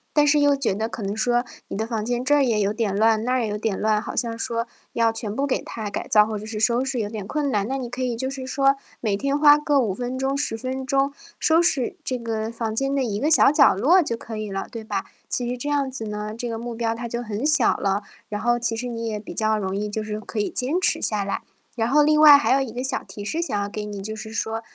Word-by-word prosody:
但 295 0 +5
是 295 0 +4
又 285 -1 +4
觉 250 -8 -1
得 220 +2 -1
可 230 - -7
能 200 +2 -3
说 240 +2 +2 0.3
你 - - -4
的 220 +2 -2
房 220 -2 -2
间 245 +1 -1
这 290 +2 +4
也 225 -4 +1
有 200 0 +1
点 215 -3 -1
乱， 220 +1 +3
那 255 +1 +1
也 225 - 0
有 210 0 -2
点 210 -2 -2
乱， 215 0 +2
好 - - -6
像 230 -2 -1
说 230 +1 -2 0.2
要 230 -1 +2
全 220 -2 -5
部 280 +1 0
给 260 - 0
它 215 -2 -5
改 - - -4
造 210 -1 +6
或 215 -1 -3
者 210 - -7
是 220 -1 -5
收 235 +4 +2
拾 265 -3 -2
有 205 -1 -2
点 210 -3 -6
困 290 +4 -1
难。 205 -3 0
那 270 +1 -2
你 245 -2 -5
可 255 +1 -4
以 245 -2 -1
就 260 +3 -3
是 270 -1 -6
说 275 +1 +2 0.3
每 205 -4 0
天 280 +4 0
花 295 -1 +8
个 295 -2 +2
5 220 -6 +1
分 245 +5 -4
钟、 270 +1 0
10 280 -6 -1
分 260 +3 -4
钟 275 0 +1 0.3
收 325 +1 +4
拾 280 -8 +1
这 255 -2 -2
个 225 -1 -3
房 225 -1 -3
间 270 +3 0
的 275 - +1
一 210 -4 -2
个 305 +4 +1
小 295 - +6
角 290 -2 +6
落 325 - +4
就 235 -6 -2
可 225 -1 -8
以 215 -2 -4
了， 195 - -3
对 230 -2 -6
吧？ 205 -3 -3 0.2
其 245 -1 -2
实 250 - -3
这 285 - -5
样 285 -2 +1
子 250 -4 -6
呢， 210 0 -4
这 240 - -3
个 225 -1 -4
目 235 0 -5
标 225 0 0
它 235 +1 -5
就 235 +1 -4
很 215 +3 -4
小 300 -5 +3
了， 195 +1 -1 0.3
然 210 -1 -3
后 240 +2 +1
其 230 -1 -1
实 245 +3 -4
你 230 -1 -4
也 210 -1 -3
比 205 - -9
较 215 -1 +1
容 190 -2 -2
易 210 +1 -2
就 215 +1 -3
是 215 0 -4
可 220 - -9
以 205 - +1
坚 275 +8 -1
持 - - +1
下 210 -2 0
来。 200 - -3 0.3
然 230 -1 0
后 295 +2 +5
另 305 +1 +4
外 295 -2 +10
还 285 - +2
有 270 - +3
一 250 -4 -3
个 250 +2 -4
小 265 0 -2
提 205 - -9
示 325 +10 -1
想 210 -11 -1
要 200 - -1
给 210 +1 -5
你， 205 -1 -6
就 215 +3 -5
是 220 0 -8
说， 225 0 -2
230 Hz, 305 characters per minute, -23 LUFS, 215-265 Hz, 0.3 s, 外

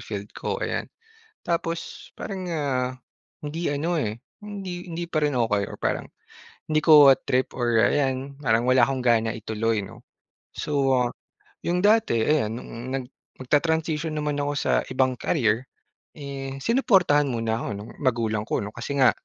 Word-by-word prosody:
field - - -5
ko, - - -3
ayan. - - -2 0.6
Tapos 165 -1 -3
parang, 195 -3 -5
ah, 130 -5 -1 0.4
hindi 155 +2 -3
ano, 155 +5 -1
eh, 110 +1 -3 0.2
hindi 190 -4 -6
hindi 170 +1 -4
pa 155 -2 -1
rin 145 -4 +1
okey 105 -3 +2
or - - -9
parang, - - -2 0.6
hindi 155 - +3
ko 150 -4 +9 0.2
trip 130 +1 +1
or 120 -2 +2
ayan 135 -1 +1
parang 115 -5 +2
wala 130 0 +5
akong 135 -2 -2
gana 115 -2 +2
ituloy, 110 0 -1
'no? 95 - -12 0.5
So, 140 -2 0 0.2
ah, - - -6 0.6
'yong 175 +1 +1
dati 210 - +4
ayan 145 -5 +2
no'ng 120 +1 -7
nag 130 -2 -3 0.4
magta-transition 160 +3 +1
naman 150 -1 -1
ako 145 0 0
sa - - 0 0.2
ibang 130 -1 0
career, 125 -4 +1 0.5
eh, 135 -2 -6
sinuportahan 190 - +3
muna 115 -2 -1
ako - - -4
no'ng 105 +2 -8
magulang 115 -4 0
ko, - - -1
'no? 105 - -6
Kasi 120 +5 -5
nga 130 - +7
135 Hz, 155 wpm, -25 LUFS, 120-160 Hz, 0.6 s, ko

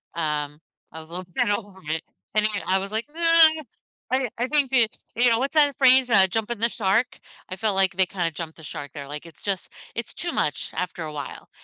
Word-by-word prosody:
um, 150 -2 -2 0.3
I 160 - -8
was 160 0 -12
a - - -16
little 185 +1 -5
scared 175 +3 -1
of 205 0 -1 0.2
it 160 0 -1 0.3
and, 215 0 +3
again, 210 -2 -1
I 190 +1 +3
was, 195 +2 -6
like, 220 +1 -2
"No" 320 - -12 0.9
I 260 - +3
didn' 255 -4 -2
I 245 - 0
think 285 -2 +3
the 245 -4 +5 0.3
you 245 +1 +5
know, 230 0 +3
what's 275 +4 -1
that 290 -3 +4
phrase? 260 -1 +5
Uh, 195 -4 +6
jumping 225 +3 -2
the 230 - +2
shark? 220 +2 0 0.3
I 185 - -4
felt 210 -1 0
like 190 -1 +3
they 190 - +4
kinda 175 -3 -2
jumped 160 +1 -7
the 160 - -13
shark 145 -1 -7
there, 140 -2 -7
like, 150 +2 -7
it's 165 -3 -15
just 195 -3 -3 0.2
it's 230 -1 -5
too 345 0 -3
much 150 - -1
after 180 -2 -3
a 155 -1 -6
while. 145 -1 -7
195 Hz, 235 wpm, -24 LUFS, 165-240 Hz, 0.9 s, Uh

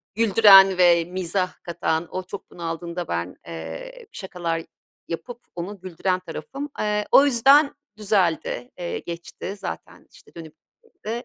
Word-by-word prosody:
güldüren 195 -3 +7
ve 170 -2 +5
mizah 185 +1 -2
katan, 170 -1 -2
o 185 - -4
çok 190 +2 -9
bunaldığında 170 0 -5
ben, 85 +2 -3
eee, 85 - -8
şakalar 175 -4 -4 0.5
yapıp 235 +8 -6 0.2
onu 180 +3 -6
güldüren 185 0 -2
tarafım. 275 +9 -7
Eee, 210 0 0
o 275 - +8
yüzden 280 +3 +5 0.2
düzeldi. 180 - 0
Iıı, 175 - -3
geçti 175 +3 -7
zaten, - - -8
işte, - - -20
dönüp 160 -2 -10 0.3
gittiğinde 240 - -7
185 Hz, 130 wpm, -23 LUFS, 170-210 Hz, 0.5 s, o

